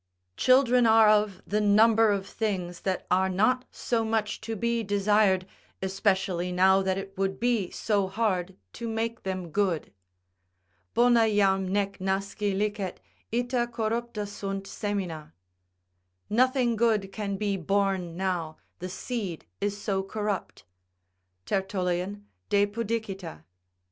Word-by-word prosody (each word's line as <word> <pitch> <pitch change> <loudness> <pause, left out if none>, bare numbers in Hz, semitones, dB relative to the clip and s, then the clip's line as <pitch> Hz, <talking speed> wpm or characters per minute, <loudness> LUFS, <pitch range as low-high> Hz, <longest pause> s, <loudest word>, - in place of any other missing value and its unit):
Children 250 - +4
are 220 0 +6
of 210 -2 +2
the 210 +1 0
number 220 +2 +5
of 200 -2 0
things 185 -6 -3
that 190 -2 -2
are 190 +1 +3
not 220 +7 +2
so 230 -2 -1
much 220 -1 -1
to 225 +1 -4
be 235 +2 0
desired, 205 -2 +2 0.3
especially 190 -2 0
now 190 +2 +4
that 190 0 0
it 195 0 -7
would 195 0 -1
be 230 -6 +1
so 200 -3 0
hard 190 -3 -1 0.2
to 235 0 -5
make 225 +1 -2
them 185 -2 -4
good: 185 - 0 1.0
"Bona 235 -2 +5
jam 195 -2 +2
nec 200 0 -1
nasci 195 +2 -1
licet, 205 -3 -2 0.3
ita 245 +1 0
corrupta 230 0 -2 0.2
Bunt 195 -1 -3
semina;" 185 - -4 1.0
["Nothing 250 +1 +3
good 215 -4 +1
can 200 -1 -3
be 205 -1 0
born 190 -1 0
now, 175 -4 -2 0.2
the 185 +1 -5
seed 195 -3 -4
is 205 0 -2
so 195 -2 -1
corrupt." 205 0 -4 0.8
Tertullian, 190 +1 -2 0.2
De 205 0 +4
Pudicita. 205 - -4
200 Hz, 125 wpm, -27 LUFS, 190-225 Hz, 1.0 s, are